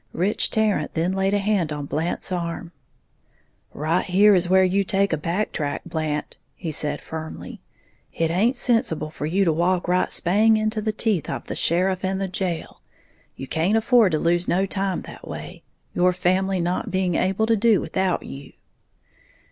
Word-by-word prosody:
Rich 195 +5 0
Tarrant 210 -9 0
then 170 +3 +1
laid 195 +1 +1
a - - +3
hand 195 -5 0
on 145 -1 -4
Blant's 160 +6 -2
arm. 170 -1 -4 1.0
"Right 160 +4 0
here 200 +3 +5
is 180 -2 +2
where 190 0 +5
you 190 +2 +2
take 195 +1 +1
a - - +4
back 175 +7 -2
track, 145 -2 -3
Blant," 155 -2 -3 0.2
he 165 -3 -5
said, 150 0 -3
firmly; 160 0 -8 0.5
"it 165 -1 -1
haint 225 +9 +2
sensible 225 - 0
for 150 -1 -4
you 190 +5 +2
to 165 - +3
walk 175 +3 +1
right 180 +1 +1
spang 215 +5 +3
into 215 0 -1
the 215 +1 0
teeth 215 -5 0
of - - -4
the - - -5
sheriff 185 +2 +1
and 190 0 -1
the 195 - -1
jail, 180 -3 -4 0.5
you 135 - -7
can't 165 +10 +1
afford 225 -5 +4
to - - +3
lose 175 +2 +1
no 190 +3 +2
time 195 -1 -2
that - - -11
way, - - -8 0.3
your 180 +1 +3
family 185 +1 +1
not 175 +1 -1
being 185 -1 0
able 190 +5 +1
to 225 0 +3
do 220 -2 +3
without 190 -2 -1
you." 140 0 -10
185 Hz, 180 wpm, -23 LUFS, 165-200 Hz, 1.0 s, here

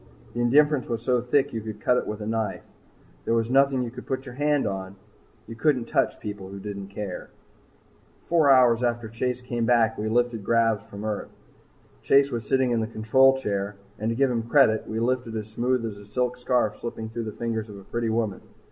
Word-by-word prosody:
The 120 - -4
indifference 145 +2 +3
was 115 -1 -2
so 125 -1 +2
thick 125 +3 +1
you 115 - -3
could 110 -1 -7
cut 125 - +2
it - - -2
with 105 0 -5
a - - -4
knife. 110 -2 -2
Yet - - -30
there - - +1
was 115 +1 0
nothing 135 -1 +4
you 120 - -5
could 130 - -10
put 130 -1 -3
your 130 - -8
hand 145 +1 +1
on. 95 -1 -4 0.5
You 115 - -8
can't 125 -2 +1
touch - - 0
people 100 -3 -6
who 100 - -8
don't 100 0 -6
care. 100 -2 -6 0.9
Four 160 -4 +3
hours 125 -3 +6
after 120 -2 -1
Chase 125 +3 -3
came 120 -2 -2
back, 115 -3 +3
we 110 +1 -1
lifted 120 -1 +1
gravs 115 0 +2
from 100 0 -7
Earth. 105 -2 -3 0.7
Chase 140 - +4
was 115 -3 -4
sitting 130 -2 +2
in 120 - +2
the 110 - -1
control 130 +4 +4
chair, 100 -4 -2 0.2
and 110 +1 -1
to 115 - -1
give 135 +1 +2
him 115 -2 0
credit, 120 -7 +4
we 110 - -3
lifted 120 -1 -1
as 110 0 -6
smooth 125 +1 0
as 105 -3 -6
a 100 - -13
silk 125 +1 0
scarf 125 -3 0
slipping 115 -1 -5
through 115 0 -4
the 110 - -4
fingers 110 0 -3
of 100 - -9
a 100 - -11
pretty 115 +3 -2
woman. 110 -3 -1
115 Hz, 220 wpm, -25 LUFS, 110-125 Hz, 0.9 s, hours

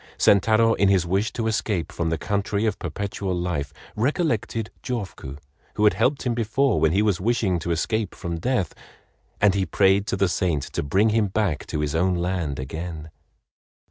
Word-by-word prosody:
Sentaro, 110 +3 +4
in 100 -2 +3
his 95 -3 +3
wish 95 +5 0
to 115 - -2
escape 105 -5 -1
from 85 -1 -2
the 80 - 0
country 100 +4 -1
of 105 -3 -1
Perpetual 95 +2 -3
Life, 85 -5 -2 0.2
recollected 115 - -1
Jofuku, 100 - -5 0.4
who 105 - 0
had 105 - +6
helped 125 +9 +1
him 125 - 0
before 115 +3 +1
when 80 - +3
he 100 +5 +2
was 100 -4 +1
wishing 105 -5 +1
to 85 - -5
escape 100 +5 -1
from 85 -1 -4
death—and 100 -1 -2
he 100 -1 +1
prayed 95 +3 +2
to 95 - -1
the 95 0 +3
saint 85 -5 0
to - - -3
bring 95 +10 +2
him 110 -1 +2
back 95 -6 -1
to 75 - -2
his 75 -1 -1
own 90 +3 +2
land 85 -5 -2
again. 80 +3 -6
95 Hz, 175 wpm, -24 LUFS, 85-110 Hz, 0.4 s, had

